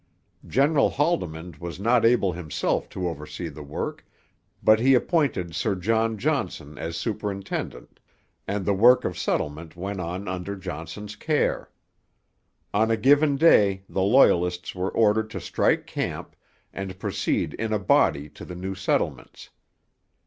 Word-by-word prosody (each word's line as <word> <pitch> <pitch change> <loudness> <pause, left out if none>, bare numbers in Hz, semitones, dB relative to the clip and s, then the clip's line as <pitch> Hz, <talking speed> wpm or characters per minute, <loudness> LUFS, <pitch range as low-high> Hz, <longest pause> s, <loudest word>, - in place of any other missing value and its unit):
General 140 +2 +3
Haldimand 90 - -2
was 85 +1 -7
not 115 +3 +3
able 115 -5 +4
himself 80 -3 -2
to 90 -1 -3
oversee 80 +1 -6
the 75 0 -10
work; 70 0 -5 0.6
but 110 0 +6
he 130 +3 +5
appointed 125 - 0
Sir 105 +1 0
John 110 +4 0
Johnson 100 - -2
as 80 +3 -5
superintendent, 100 -3 -4 0.5
and 100 -2 -2
the 100 - +2
work 120 +6 +5
of - - -2
settlement 80 +3 -3
went 95 +3 -5
on 90 +3 -5
under 95 +2 -4
Johnson's 95 +2 -7
care. 150 +7 0 1.0
On 110 +2 +2
a 115 - +2
given 145 +3 +4
day 100 -11 +4
the 95 - -2
Loyalists 90 -5 +3
were 95 +1 -2
ordered 110 0 +2
to - - -5
strike - - +1
camp, - - -5 0.4
and 95 -1 -6
proceed - - -1
in 110 0 -3
a 110 - +2
body 75 -6 +2
to - - -12
the 90 - -8
new 95 +2 -4
settlements. 95 - -2
100 Hz, 140 wpm, -25 LUFS, 90-115 Hz, 1.0 s, but